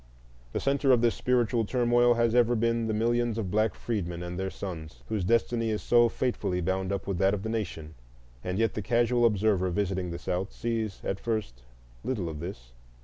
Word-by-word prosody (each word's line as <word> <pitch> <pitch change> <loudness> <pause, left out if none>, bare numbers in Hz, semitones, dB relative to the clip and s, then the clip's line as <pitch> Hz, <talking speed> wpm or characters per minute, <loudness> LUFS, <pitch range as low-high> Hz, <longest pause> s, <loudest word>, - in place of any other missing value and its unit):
The - - -2
centre 140 0 +2
of 120 -2 +5
this 120 -1 +3
spiritual 120 -2 +1
turmoil 120 +1 +3
has 115 -1 +2
ever 120 0 +4
been 115 0 +1
the 110 - 0
millions 120 +1 +1
of 100 -5 -3
black 110 -1 +1
freedmen 90 -7 -3
and 90 0 -5
their 95 0 -1
sons, 85 -6 -7
whose 110 -4 -1
destiny 115 +2 +1
is 105 -1 -2
so 120 -1 +5
fatefully 105 -8 -1
bound 95 +1 -1
up 100 -1 -2
with 95 -3 -2
that 95 +1 +3
of 100 - -6
the 110 - -3
nation. 85 -8 -4 0.5
And 90 +1 -2
yet 115 -1 +1
the 105 - -3
casual 120 +3 +2
observer 100 -3 +1
visiting 95 -1 -1
the 85 - -4
South 90 +3 -3
sees 110 -4 -3
at 95 - -2
first 105 - -3 0.4
little 105 -10 -2
of 75 -2 -6
this. 80 -8 -8
110 Hz, 200 wpm, -28 LUFS, 95-120 Hz, 0.5 s, of